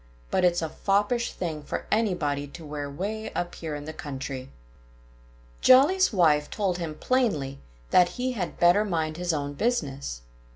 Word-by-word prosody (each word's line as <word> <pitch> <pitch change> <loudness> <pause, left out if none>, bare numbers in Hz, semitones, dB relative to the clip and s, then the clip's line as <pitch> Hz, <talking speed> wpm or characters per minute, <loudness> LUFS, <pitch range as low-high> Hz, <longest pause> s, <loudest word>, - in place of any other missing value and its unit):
But 185 - +2
it's 175 -1 +3
a 160 - -2
foppish 205 +7 +1
thing 160 -4 -4
for 145 - -5
anybody 160 -10 0
to 160 +3 -11
wear 145 -1 -5
way 205 +9 -4
up 175 0 -2
here 160 -3 -5
in 145 0 -7
the 155 - -6
country." 135 -3 -6 1.1
Jolly's 295 +9 +6
wife 155 -7 +3
told 190 -4 -1
him 160 -3 -4
plainly 155 - 0 0.3
that 180 -1 +6
he 255 +1 0
had 195 -8 -4
better 175 +4 +5
mind 160 -5 -2
his 180 0 0
own 145 -2 -2
business. 140 - -2
170 Hz, 160 wpm, -26 LUFS, 145-205 Hz, 1.1 s, Jolly's